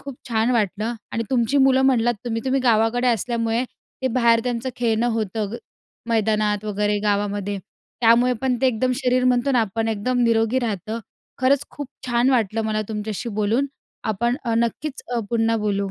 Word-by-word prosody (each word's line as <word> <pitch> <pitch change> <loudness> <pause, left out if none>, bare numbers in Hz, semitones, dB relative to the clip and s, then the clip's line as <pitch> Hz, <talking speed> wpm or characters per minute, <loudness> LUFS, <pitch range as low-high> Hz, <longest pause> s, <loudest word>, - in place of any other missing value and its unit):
खूप 275 -1 -8
छान 225 0 +1
वाटलं 215 -1 0 0.2
आणि 230 - -1
तुमची 255 +2 +1
मुलं 265 0 +4
म्हणलात 240 -3 +3
तुम्ही 230 -1 -2
तुम्ही 265 0 +1
गावाकडे 235 +1 +2
असल्यामुळे 230 +1 0 0.4
ते 260 - +2
बाहेर 235 -1 +3
त्यांचं 245 +1 -2
खेळणं 235 -1 +1
होतं, 220 -2 -1
ग 235 - -3 0.5
मैदानात 215 -2 +1
वगैरे 210 0 0
गावामध्ये 205 -1 -1 0.4
त्यामुळे 240 +2 +5
पण 255 -2 +1
ते 265 - +3
एकदम 255 +1 +1
शरीर 255 -1 +1
म्हणतो 250 +1 +2
ना 245 - +4
आपण 225 +1 -1
एकदम 225 +4 -1
निरोगी 225 +2 +2
राहतं. 220 -1 -3 0.4
खरंच 270 +2 +3
खूप 290 -3 -7 0.2
छान 240 +2 +2
वाटलं 225 -3 +1
मला 215 0 0
तुमच्याशी 215 +1 -4
बोलून 225 +7 +1 0.4
आपण 235 +4 0
अ, 230 - 0
नक्कीच 260 +5 -2
अ, 235 - +1
पुन्हा 225 -1 +2
बोलू. 200 -2 -1
230 Hz, 165 wpm, -22 LUFS, 215-250 Hz, 0.5 s, त्यामुळे